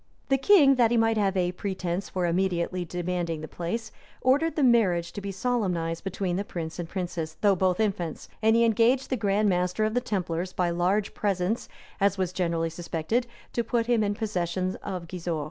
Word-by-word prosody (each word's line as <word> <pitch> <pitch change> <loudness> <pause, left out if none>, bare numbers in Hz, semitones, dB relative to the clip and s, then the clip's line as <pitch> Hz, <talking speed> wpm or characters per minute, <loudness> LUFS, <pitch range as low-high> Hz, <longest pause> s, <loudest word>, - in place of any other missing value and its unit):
The 270 - +4
king, 275 -4 +6
that 235 -2 +5
he 240 - +2
might 225 0 +3
have 195 -2 +1
a 180 -1 +1
pretence 185 -1 -3
for 185 -1 -1
immediately 180 0 0
demanding 175 -2 -3
the 155 - -6
place, 215 +8 -4 0.3
ordered 290 +6 +2
the 300 - +1
marriage 195 -9 +3
to 205 - -5
be 200 0 -4
solemnized 185 -7 -1
between 190 -2 -2
the 200 - -1
prince 165 -4 -6
and 170 -1 -4
princess, 175 -4 -4
though 200 -2 +4
both 185 +1 +1
infants; 190 -7 -2
and 220 +1 +4
he 235 0 +5
engaged 235 +5 +2
the - - +3
grand 210 -2 +1
master 180 +2 +1
of 215 - -1
the 245 - +1
templars, 180 -5 -2
by 175 -1 0
large 185 +4 +1
presents, 200 +2 -1 0.3
as 200 -1 +2
was 185 -2 -1
generally 170 -3 0
suspected, 175 +8 -2 0.3
to 235 - 0
put 230 0 0
him 235 -2 +2
in 205 0 0
possession 185 -3 -2
of 180 -3 -5
Gisors. 170 -2 -3
190 Hz, 195 wpm, -27 LUFS, 175-220 Hz, 0.3 s, king